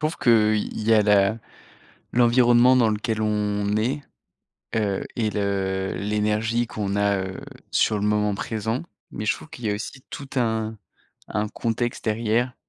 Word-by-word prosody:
trouve 155 +1 -1
que, 120 - +1 0.2
heu, - - +2
il 105 - -4
y 115 - +5
a 110 - +6
la 105 +1 +3 0.7
l'environnement 120 +1 +5
dans 115 -3 +4
lequel 110 +1 -1
on 105 -1 0
est, 130 +7 -1 0.7
heu 105 -3 0
et 110 -3 0
le 95 -2 -1
l'énergie 105 +3 0
qu'on 100 -2 -3
a, 100 -1 +2
heu, 95 0 -7 0.3
sur 110 - +2
le 100 - -2
moment 105 -1 +1
présent 110 +4 -3 0.3
mais 105 - -5
je 105 - +2
trouve - - -13
qu'il 120 -6 -7
y - - +1
a - - 0
aussi 120 +5 -7
tout 140 - -7
un 110 -2 0 0.5
un 105 0 -1
contexte 120 +2 -2
derrière, 115 +3 0
110 Hz, 165 wpm, -24 LUFS, 105-120 Hz, 0.7 s, a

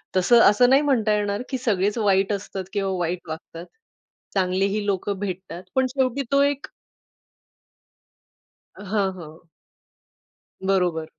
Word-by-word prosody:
तसं 210 +6 +5
असं 245 +4 +4
नाही 270 +2 +5
म्हणता 240 -7 +2
येणार 205 0 -1
की 265 - -2
सगळेच 210 -4 0
वाईट 200 -2 +2
असतात 195 -1 -5
किंवा 195 -2 -1
वाईट 175 +1 -3
वागतात. 165 +1 -8 0.7
चांगलेही 195 +2 0
लोकं 200 0 -1
भेटतात 185 -3 -6
पण 260 0 +3
शेवटी 265 +1 -1
तो 280 0 +4
एक 285 0 -1 2.1
हां, 200 0 -1
हां. 160 -3 -12 1.2
बरोबर 180 -4 +1
200 Hz, 120 wpm, -23 LUFS, 185-235 Hz, 2.1 s, तसं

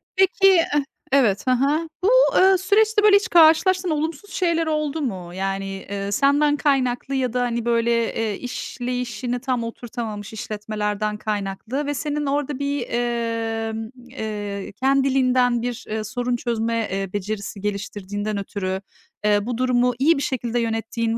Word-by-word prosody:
Peki, 385 +1 +4 0.3
eh 295 -1 +2 0.3
evet, 240 -5 +3
hı - - +4
hı. 290 +6 +1
Bu, 405 - +4 0.3
eee, 380 0 +6
süreçte, 420 +3 +3
böyle, 415 -1 +7
hiç 410 +3 +2
karşılaştığın 345 +3 +5
olumsuz 315 +5 -2
şeyler 335 -3 +1
oldu 305 0 -1
mu? 185 -9 -4
Yani, 195 +1 -2
eee, 200 +1 -5
senden 290 +3 +3
kaynaklı 270 -2 0
ya 255 -3 0
da, 250 - +1
hani, 235 -1 -1
böyle, 235 0 +2 0.2
eee, 220 -3 -2
işleyişini 245 -1 -4
tam 255 -2 -1
oturtamamış 225 -3 -6
işletmelerden 210 0 -3
kaynaklı 215 +6 -3
ve 290 - -1
senin 295 +1 -2
orada 285 0 -1
bir, 280 -3 -1
emm, 225 -2 -2 0.2
eee, 205 -5 -5
kendiliğinden 260 -3 +3
bir, 245 0 -4
eee, 220 0 -2
sorun 245 +2 -2
çözme, 230 -2 -1
eee, 195 -1 -3
becerisi 205 0 -4
geliştirdiğinden 205 0 -3
ötürü, 190 -1 -3 0.4
eee, 205 0 +3
bu 240 -1 -3
durumu 250 -1 +2
iyi 310 +3 +4
bir 275 - -2
şekilde 240 -2 -1
yönettiğin 225 0 -1
240 Hz, 145 wpm, -22 LUFS, 215-280 Hz, 0.4 s, böyle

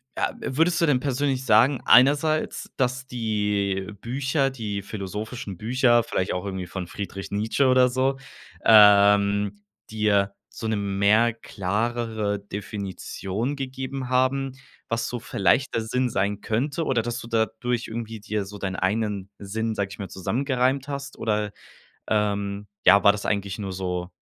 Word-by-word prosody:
ja - - -1
würdest 165 +5 +1
du - - +5
denn 140 -5 +3
persönlich 135 0 -1
sagen 125 +4 +4
einerseits, 145 +4 +4
dass 130 0 -1
die 105 -5 -1
Bücher, 135 +3 0
die 105 -6 -4
philosophischen 105 +1 -6
Bücher, 120 - +3
vielleicht 95 -3 -2
auch 90 +1 -3
irgendwie 95 -2 -4
von 90 +1 -5
„Friedrich 95 +2 -7
Nietzsche“ 110 +7 +1
oder 130 0 +5
so, 130 +2 0 0.5
ähm, 100 -1 +6 0.3
dir 100 -2 +1
so 110 - -6
'ne 110 - 0
mehr 100 +3 +2
klarere 110 0 -2
Definition 100 +3 -4
gegeben 130 -1 -5
haben, 130 +1 +1 0.4
was 115 0 -1
so 120 - -4
vielleicht 115 +6 +1
der 115 - 0
Sinn 125 +3 0
sein 100 -1 -1
könnte 140 +10 -1
oder, 130 -6 +1
dass 120 +2 -4
du - - -9
dadurch 115 +1 -1
irgendwie 115 0 -6
dir 105 0 -2
so 105 +1 -9
dein 95 -1 -3
einen 100 0 -1
Sinn, 110 +3 -3
sage 100 -2 -1
ich 100 - -10
mal, 100 -3 -5
zusammengereimt 130 +7 0
hast 140 -1 -6
oder, 105 -2 -1 0.6
ähm, 100 -1 -1 0.2
ja, 100 +2 +7
war 100 - +8
das 105 0 -5
eigentlich 100 -2 -2
nur 100 -2 -4
so 90 -1 -3
110 Hz, 150 wpm, -25 LUFS, 100-125 Hz, 0.6 s, war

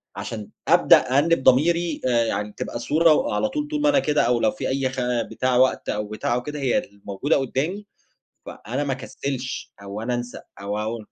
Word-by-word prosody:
عشان 110 -3 -6 0.2
أبدأ - - +7 0.2
أأنب 165 -1 +3
ضميري 160 +5 +3
آآ 120 -2 +2
يعني 105 -2 -2
تبقى 120 - -4
صورة، 155 +5 +4
وعلى 270 - 0
طول 295 +2 -3
طول 300 -1 -2
ما 295 - +4
أنا 280 -1 +4
كده 150 - +1
أو 120 0 +2
لو 110 - +2
في - - -4
أي 130 0 0
خ 130 0 -6 0.3
بتاع 130 -1 0
وقت 130 +1 +2
أو 105 0 -2
بتاع 110 +2 -2
أو 125 - -2
كده 150 +2 -5
هي 130 -3 +1
الموجودة 100 +7 -2
قدامي، 155 +10 -2 0.6
ف - - -8
أنا 130 +6 -4
ما 140 - -1
أكسلش 130 0 -5
أو 100 +1 -6
أنا 125 +1 -1
أنسى 120 0 -5 0.2
أو 100 +1 -3
أو 110 +2 -3
130 Hz, 200 wpm, -23 LUFS, 115-155 Hz, 0.6 s, أبدأ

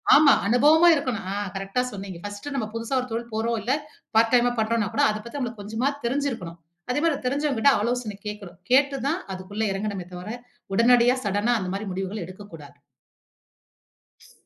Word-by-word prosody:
ஆமா. 290 -1 +7
அனுபவமா 300 +9 +5
இருக்கணும் 255 -8 -2
ஆ - - -2 0.2
கரெக்ட்டா 195 +6 -1
சொன்னீங்க. 195 -3 -7
பர்ஸ்ட் 205 +5 -7
நம்ம 225 -6 -1
புதுசா 230 +3 -2
ஒரு 255 - -6
தொழில் 235 0 -4
போறோம் 225 +1 0
இல்ல 255 - +1 0.4
பார்ட் 225 0 +4
டைமா 245 0 +3
பண்ணுறோன்னா 220 -2 +1
கூட - - +3
அத 215 - -1
பத்தி 280 +5 -6
நமக்கு 235 -4 -4
கொஞ்சமாவது 255 +7 -2
தெரிஞ்சு 280 +3 0
இருக்கணும். 175 -7 -7 0.3
அதே 290 - 0
மாரி 325 -4 +2
தெரிஞ்சவுங்க 280 -1 0
கிட்ட 280 +2 +6
ஆலோசன 235 -3 -2
கேட்கணும். 200 -5 -8
கேட்டு 275 +1 +4
தான் 325 +5 0
அதுகுள்ள 195 +4 -4
இறங்கணுமே 195 -2 -4
தவிர, 180 +3 -7 0.5
உடனடியா 245 +2 +5
சடன்னா 205 +4 +1
அந்த 185 -2 -4
மாரி 205 +1 -4
முடிவுகள் 190 +2 -4
எடுக்க 185 +3 -11
கூடாது. 145 -2 -13 1.5
ஸ் - - -20
230 Hz, 175 wpm, -25 LUFS, 200-255 Hz, 1.5 s, ஆமா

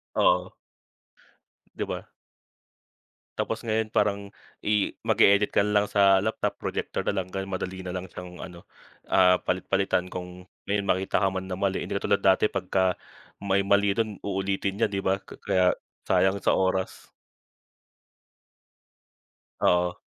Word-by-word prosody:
Oo. - - +2 1.2
'Di - - -2
ba? - - -6 1.3
Tapos 115 - -2
ngayon, 110 0 0
parang 100 -1 +2 0.5
i 105 -1 +1
mag-e-edit 100 +1 +4
ka - - +4
na 105 0 +2
lang - - -4
sa 100 -1 +5
laptop, 110 +1 -2
projector - - -3
na 100 -1 0
lang 90 - -9
dahil 95 +1 -4
madali 95 0 -4
na 90 - -4
lang 90 0 -5
siyang 90 0 -9
ano, 90 -2 -10 0.4
ah, 90 -1 +5
palit-palitan 95 0 0
kung 90 0 -8 0.2
may 100 +1 0
makita 95 0 0
ka 95 - +3
man 95 0 -4
na 90 - -3
mali, 95 -1 0
hindi - - -5
katulad 100 0 0
dati 95 +2 +4
pagka 95 -1 0 0.5
may 100 0 +2
mali 100 0 +3
dun 110 -2 -2
uulitin 95 0 -2
niya - - +3
'di 100 -1 -2
ba, 95 +1 +1
ka - - -13
kaya, 95 -2 +2 0.3
sayang 95 +1 +3
sa - - +3
oras. 95 0 -1 2.5
Oo. 90 0 +2
95 Hz, 145 wpm, -26 LUFS, 95-100 Hz, 2.5 s, sa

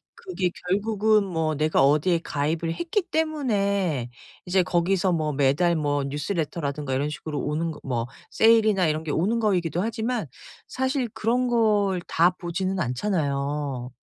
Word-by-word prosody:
그게 190 - -2 0.2
결국은 210 +2 +2
뭐 160 -4 -1
내가 155 -2 +2
어디에 155 +5 +3
가입을 160 +3 -1
했기 345 +3 -1
때문에 200 - 0 0.4
이제 180 0 +2
거기서 180 +2 +1
뭐 155 -3 0
매달 145 +5 +2
뭐 145 -2 0
뉴스레터라든가 145 -2 -3
이런 145 +3 0
식으로 150 0 -5
오는거 155 +1 -2
뭐 120 -3 -2 0.2
세일이나 215 -5 +4
이런게 155 0 -2
오는거이기도 185 -3 +1
하지만 225 -1 -2 0.4
사실 260 -1 -1
그런걸 220 -5 +1
다 175 +3 +3
보지는 185 +2 -3
않잖아요. 140 - -2
175 Hz, 310 characters per minute, -25 LUFS, 150-210 Hz, 0.4 s, 세일이나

